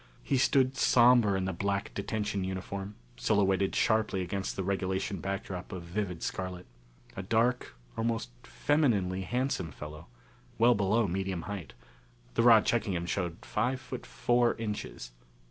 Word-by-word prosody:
He 135 - +1
stood 130 0 +3
somber 120 -6 +5
in 95 - -1
the 95 - -2
black 100 +3 -2
detention 100 -1 -2
uniform, 95 +2 -5 0.2
silhouetted 95 - +2
sharply 110 -4 +2
against 95 +2 -3
the 95 - -2
regulation 95 0 -1
backdrop 95 -2 -4
of 90 -3 -6
vivid 90 -1 -3
scarlet. 90 -1 -4 0.5
A - - -4
dark, 115 +5 +1 0.2
almost 115 - -1
femininely 95 - +1
handsome 125 - -1
fellow, 75 +3 -9 0.5
well 120 +2 +6
below 105 +2 +2
medium 95 -1 -2
height 100 -5 -6 0.6
the - - +2
rod 115 -2 +7
checking 110 -5 +1
him 85 0 -2
showed 85 -2 -3
five 130 +1 0
foot 125 0 -8
four 120 0 +2
inches. 105 - -5
100 Hz, 140 wpm, -30 LUFS, 95-115 Hz, 0.6 s, rod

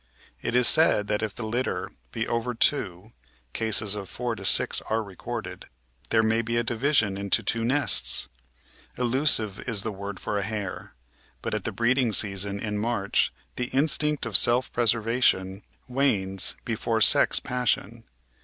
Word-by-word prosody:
It - - -3
is 125 -1 +4
said 155 -10 +4
that 105 0 -1
if 110 -2 -4
the 110 - -6
litter 120 +4 -3 0.2
be 115 - -4
over 115 +1 -3
two 110 -5 -1 0.2
— - - -38
cases 110 -2 +3
of 100 -3 -5
4 120 -1 -4
6 - - +3
are 110 +1 -1
recorded 100 -3 -8 0.2
— 65 +4 -29
^there 110 0 +2
may 110 +1 +1
be 115 +1 -3
a 120 - 0
division 115 -4 0
into 100 +3 -1
two 115 +3 -1
nests! 115 - +4 0.7
Elusive 120 -5 +1
is 105 -4 0
the 110 - -4
word 100 0 -8
for 105 - -3
a - - -3
hare, 105 -8 -6 0.5
but - - -4
at - - -4
the - - -2
breeding 120 0 0
season 100 0 +1
in 105 0 -4
March 105 -3 -1 0.3
the 125 - -2
instinct 150 +2 +1
of 115 -4 -5
self 120 +6 +4
preservation 115 -4 0 0.3
wanes 100 - 0
before - - -2
sex - - +5
passion. 120 -2 -3
110 Hz, 160 wpm, -25 LUFS, 100-120 Hz, 0.7 s, sex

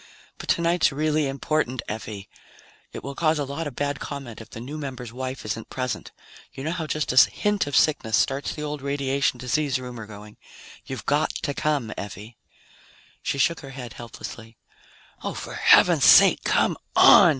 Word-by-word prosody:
But - - -9
tonight's 170 -1 +3
really 150 +1 +1
important, 135 -2 -1
Effie. 105 -2 -6 0.6
It - - -8
will 140 - -5
cause 155 +2 +1
a 145 - -1
lot 140 +4 -4
of 140 - -8
bad 145 0 -2
comment 135 -6 -7
if 115 - -12
the - - -9
new 140 +6 -6
member's 130 -5 -6
wife 130 0 -5
isn't 110 +2 -4
present. 130 -1 -4 0.4
You 135 - -7
know 155 - -1
how 165 -2 -3
just 155 -3 -1
a 130 - +7
hint 205 -6 0
of 145 - -3
sickness 110 -9 +3
starts 135 +1 0
the 150 - -5
old 150 -1 -4
radiation 140 -1 0
disease 130 +2 0
rumor 125 -4 -8
going. 105 0 -12 0.5
You've - - -6
got - - +2
to 145 - -1
come, 140 -7 -1
Effie." 105 +3 -8 0.8
She - - -2
shook 165 +5 +2
her 135 - -10
head 120 -3 -7
helplessly. 115 -1 -9 0.7
"Oh, - - -3
for - - -7
heaven's - - +5
sake, - - +7
come - - +2 0.2
on!" - - +8
135 Hz, 175 wpm, -24 LUFS, 120-150 Hz, 0.8 s, on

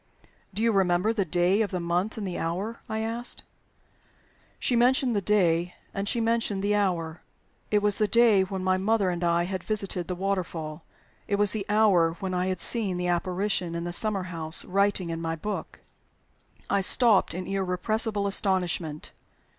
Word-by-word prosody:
"Do 210 +3 -3
you 230 - +3
remember 190 +1 +2
the 205 -4 0
day 180 +4 +2
of 210 - 0
the 180 - -3
month 175 +6 -1
and 210 - -4
the 180 - -4
hour?" 190 +8 -3
I 220 0 -2
asked. 230 +2 -3 1.2
She 250 - +1
mentioned 250 0 +3
the 200 - +1
day, 180 -4 +1 0.2
and 200 +1 -3
she 240 - 0
mentioned 225 -3 0
the 205 +1 +1
hour. 175 -6 -1 0.5
It 210 -1 +2
was 205 -1 +1
the 215 - +3
day 230 -3 +5
when 190 0 -3
my 185 0 +2
mother 200 -1 +1
and 175 0 -4
I 170 0 +2
had 185 +1 -4
visited 195 -5 -3
the 180 - -3
waterfall. 175 -5 -3 0.4
It 200 - +1
was 205 -1 +2
the 210 -2 -4
hour 200 -6 +4
when 185 +1 -5
I 180 0 0
had 185 -1 -2
seen 200 -3 0
the 180 0 -1
apparition 180 0 -1
in 170 - -3
the 175 0 -4
summer 205 0 0
house 165 -3 +1
writing 195 -2 0
in 165 0 -4
my 165 0 -2
book! 205 +6 -6 0.9
I 200 - +1
stopped 215 -3 +4
in 185 +1 -4
irrepressible 200 +3 -1
astonishment. 180 -6 0
190 Hz, 180 wpm, -26 LUFS, 175-210 Hz, 1.2 s, day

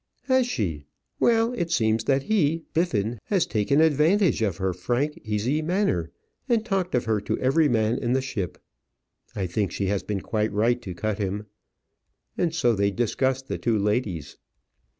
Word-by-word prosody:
"Has 260 -2 +2
she? 80 - -3 0.3
Well! 230 0 +3
It 175 -8 -2
seems 110 -7 +1
that 135 -1 +2
he, 165 -6 +1
Biffin, 120 - 0
has 195 -5 +1
taken 120 +7 +2
advantage 160 - +3
of 100 -6 0
her 95 -1 -1
frank, 120 +12 -1
easy 110 +8 0
manner, 155 - 0 0.4
and 230 -2 +2
talked 190 - -1
of 120 - 0
her 110 -2 +1
to - - -2
every 145 +4 +3
man 115 0 +1
in 120 0 0
the 130 - +3
ship. 100 -9 -4 0.8
I 100 - -1
think 95 +1 -1
she 100 - -2
has 100 - -1
been 100 -2 -3
quite 110 -1 -1
right 115 +4 +1
to 95 -6 -7
cut 110 +2 -2
him." 100 +1 -2 0.9
And 165 -2 0
so 120 -8 +3
they 100 -1 +2
discussed 130 +5 -1
the - - -3
two 115 -2 +1
ladies. 100 - -1
120 Hz, 170 wpm, -25 LUFS, 105-160 Hz, 0.9 s, Well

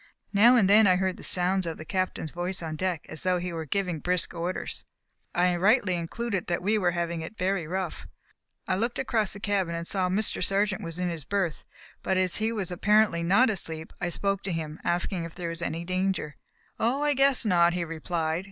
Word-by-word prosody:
Now 230 +5 +7
and 215 -6 +4
then 210 +1 +6
I 185 - +5
heard 185 0 -1
the - - -11
sound 185 0 +2
of 165 - -4
the 155 - -9
Captain's 185 -3 -2
voice 175 +1 -3
on 160 -1 -4
deck 180 -1 -2
as 155 - -6
though 185 -1 +2
he 175 0 -4
were 160 -1 -4
giving 180 +1 -1
brisk 180 +2 -1
orders; 175 +2 -4 0.5
and 175 0 +3
I 180 -1 +2
rightly 200 +1 +3
concluded 190 +4 -3
that 170 0 -1
we 210 +3 +2
were 190 -5 +2
having 170 -1 -2
it 185 +7 -8
very 185 -3 -1
rough. 185 0 -4 0.6
I 185 - +1
looked 235 +4 -1
across 225 -6 0
the 200 - -8
cabin 195 -5 0
and 170 0 -4
saw 185 0 0
that 185 - 0
Mr. 215 +1 +1
Sargent 195 -1 +1
was 165 0 -6
in 180 -1 -1
his 165 -3 -6
berth, 185 +1 -1 0.4
but 190 - 0
as 185 -1 +2
he 220 +1 0
was 200 -6 -3
apparently 205 -1 +3
not 200 +8 +4
asleep 160 -5 -3
I 175 - 0
spoke 195 +2 -1
to 195 - -2
him, 160 -2 -4
asking 175 +1 0
if 165 0 -8
there 175 -2 -4
was 165 0 -6
any 170 0 -3
danger. 185 -4 -1 0.4
"Oh, 255 +6 +1
I 295 0 +3
guess 270 -2 +3
not," 175 -4 +4
he 175 -1 -1
replied. 165 0 -2
180 Hz, 220 wpm, -27 LUFS, 170-200 Hz, 0.6 s, Now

